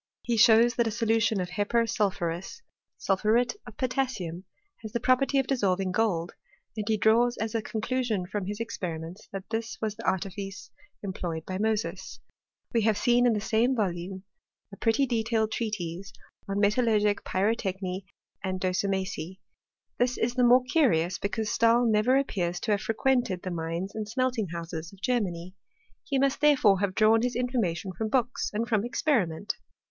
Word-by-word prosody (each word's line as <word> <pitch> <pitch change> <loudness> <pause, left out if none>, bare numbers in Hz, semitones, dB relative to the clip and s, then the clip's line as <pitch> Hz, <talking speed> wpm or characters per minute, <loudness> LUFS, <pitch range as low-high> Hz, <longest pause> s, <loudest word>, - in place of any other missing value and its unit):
He 240 - 0
shows 230 +2 +6
that 235 -1 +2
a - - +1
solution 225 -1 +1
of 180 -1 -2
hepar 205 +5 +1
snl 215 -3 +1
phuria 175 - -4 0.4
(sulpkuret 215 +5 +2
of 220 - -11
potassiuta), 245 -10 -2 0.4
has 220 -2 -8
the 235 - 0
property 260 +3 +2
of 270 - +3
dissolving 195 -8 0
gold, 180 -5 0 0.4
and 215 -1 -3
he 220 - +2
draws 235 +4 +3
as 220 0 -3
a 225 - 0
conclusion 220 -2 -2
from 190 +1 -4
his 205 +1 -4
experiments 180 -5 -5
that 195 -1 -6
this 225 0 -3
was 215 -1 -2
the 230 - -9
artifice 195 +1 -3 0.3
employed 175 -4 -4
by 185 0 -4
Mosea. 210 -5 0 0.8
We 230 - +3
have 215 -1 +2
in 245 0 +5
the 210 - 0
same 225 +4 +1
volume 185 -3 -2 0.5
a - - -6
pretty 230 +6 +2
detailed 225 -3 0
treatise 195 -5 -4 0.4
on 195 - -1
metallurgic 210 -1 +3
pyrotechny 190 -2 -1 0.4
and 185 -1 -2
docimasy. 190 -2 -2 0.6
Th» 245 0 +1
IB 230 - +1
the 250 - +3
more 250 +1 +6
curious, 205 - +2
because 215 +2 -2
Stahl 235 +1 +4
never 225 +4 +3
appears 180 -10 -1
to 220 - -1
have 205 0 +2
frequented 225 -3 0
the 185 - -4
mines 170 +3 -3
and 215 -1 -5
smelting 250 -3 0
ho 170 0 -4
uses 165 0 -6
of 195 - -16
Germany. 185 -8 -1 0.5
He 280 -4 -1
must, 275 +1 +1
therefore, 260 -10 +5
have 195 -1 -1
drawn 225 +1 +5
his 245 0 -1
in 250 +1 0
formation 190 -6 -1
from 220 +4 -2
books 255 +2 0
and 225 +2 -2
from 215 -3 +1
experiment. 220 - 0
215 Hz, 165 wpm, -28 LUFS, 190-235 Hz, 0.8 s, shows